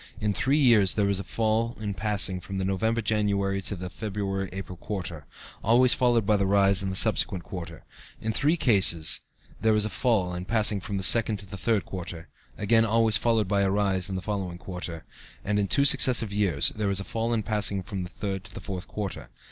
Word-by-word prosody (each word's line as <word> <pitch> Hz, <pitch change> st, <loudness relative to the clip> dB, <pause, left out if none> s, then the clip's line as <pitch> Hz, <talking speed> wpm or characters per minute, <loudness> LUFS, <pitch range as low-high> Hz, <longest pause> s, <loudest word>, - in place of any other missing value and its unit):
In 105 Hz, -1 st, -1 dB
three 135 Hz, +9 st, 0 dB
years 115 Hz, -, +3 dB
there 100 Hz, -2 st, +1 dB
is 100 Hz, -1 st, +1 dB
a -, -, -5 dB
fall 115 Hz, +2 st, -2 dB
in 105 Hz, -2 st, -4 dB
passing 100 Hz, -2 st, -1 dB
from 95 Hz, +1 st, -8 dB
the 95 Hz, -, -2 dB
November 110 Hz, +5 st, -1 dB
January 100 Hz, -2 st, -1 dB
to 100 Hz, -, -2 dB
the 90 Hz, 0 st, -7 dB
February 95 Hz, -1 st, -4 dB
April 95 Hz, -1 st, -8 dB
quarter 90 Hz, -, -7 dB, 0.4 s
(always 120 Hz, +3 st, +5 dB
followed 120 Hz, -4 st, +1 dB
by 105 Hz, -, +2 dB
a 100 Hz, -1 st, +1 dB
rise 100 Hz, 0 st, +3 dB
in 95 Hz, -, -3 dB
the 95 Hz, -, -4 dB
subsequent 95 Hz, -3 st, +4 dB
quarter); 85 Hz, -4 st, -9 dB, 0.4 s
in 110 Hz, 0 st, -3 dB
three 150 Hz, +9 st, +1 dB
cases 95 Hz, -, +3 dB, 0.4 s
there 110 Hz, -1 st, +2 dB
is 105 Hz, 0 st, +2 dB
a 110 Hz, -, -4 dB
fall 100 Hz, -6 st, 0 dB
in 90 Hz, +1 st, -6 dB
passing 105 Hz, -1 st, +2 dB
from 100 Hz, +2 st, -5 dB
the 95 Hz, -, -3 dB
second 110 Hz, +1 st, +5 dB
to 100 Hz, -, -11 dB
the 100 Hz, +1 st, -10 dB
third 110 Hz, 0 st, -1 dB
quarter 85 Hz, -3 st, -8 dB, 0.3 s
(again 115 Hz, +2 st, +2 dB
always 115 Hz, 0 st, +2 dB
followed 115 Hz, -4 st, 0 dB
by 100 Hz, 0 st, 0 dB
a 100 Hz, -, +1 dB
rise 95 Hz, -2 st, 0 dB
in 95 Hz, -, -4 dB
the 95 Hz, -, -5 dB
following 95 Hz, -4 st, -4 dB
quarter), 90 Hz, -3 st, -8 dB, 0.4 s
and 105 Hz, +1 st, 0 dB
in 100 Hz, -, 0 dB
two 140 Hz, +7 st, +3 dB
successive 130 Hz, -7 st, +5 dB
years 95 Hz, -8 st, +2 dB
there 105 Hz, -2 st, -3 dB
is 100 Hz, -1 st, 0 dB
a -, -, -4 dB
fall 115 Hz, +3 st, -3 dB
in 115 Hz, -2 st, -1 dB
passing 100 Hz, -2 st, 0 dB
from 95 Hz, 0 st, -6 dB
the 90 Hz, -, -7 dB
third 95 Hz, 0 st, -5 dB
to 95 Hz, -2 st, -13 dB
the -, -, -6 dB
fourth 95 Hz, -3 st, -7 dB
quarter. 105 Hz, -3 st, -6 dB
100 Hz, 220 wpm, -26 LUFS, 95-110 Hz, 0.4 s, always